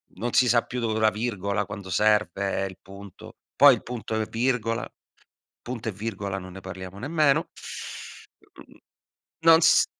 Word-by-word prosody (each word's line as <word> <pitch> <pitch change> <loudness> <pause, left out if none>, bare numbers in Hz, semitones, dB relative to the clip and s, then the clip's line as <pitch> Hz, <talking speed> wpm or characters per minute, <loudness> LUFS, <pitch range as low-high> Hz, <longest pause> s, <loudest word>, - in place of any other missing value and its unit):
non 120 +1 -3
si 125 - +5
sa 120 0 +4
più 125 - -5
dove 110 -2 -1
è 110 - -1
la 110 - +4
virgola 105 -3 -2
quando 95 -2 -8
serve, 105 -2 +1
il 95 - -11
punto. 100 -1 -12 0.2
Poi 140 0 +8
il 110 - -10
punto 115 -2 -4
e 110 - 0
virgola 115 -1 -1 0.7
punto 120 -1 -5
e 110 - -2
virgola 100 -1 -4
non 95 -1 -9
ne 95 - -9
parliamo 95 +1 -8
nemmeno. 150 +2 +2 1.1
Uhm, - - -20 0.7
non 165 0 +8
s 160 - +5
110 Hz, 160 wpm, -25 LUFS, 100-125 Hz, 1.1 s, Poi